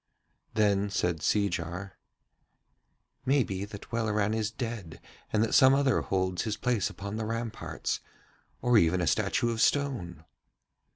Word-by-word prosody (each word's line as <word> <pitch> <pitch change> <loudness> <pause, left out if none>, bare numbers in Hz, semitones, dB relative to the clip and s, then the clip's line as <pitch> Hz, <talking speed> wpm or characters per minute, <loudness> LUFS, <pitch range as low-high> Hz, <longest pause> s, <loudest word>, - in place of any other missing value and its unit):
Then 100 -2 +2
said 90 -3 0
Seejar: 90 0 -1 1.3
'Maybe 125 -8 +1
that 105 0 -11
Welleran 110 -2 0
is 110 -1 0
dead 110 -7 -6 0.3
and 110 0 +3
that 115 - -1
some 130 +1 +7
other 140 -2 +2
holds 95 -1 -1
his 110 -2 -2
place 120 -6 0
upon 100 +2 -6
the 110 - -2
ramparts, 115 0 -3 0.6
or 125 -2 +5
even 85 +1 +3
a 90 - +1
statue 120 +8 +1
of 115 -1 -2
stone.' 115 - 0
105 Hz, 130 wpm, -29 LUFS, 95-115 Hz, 1.3 s, some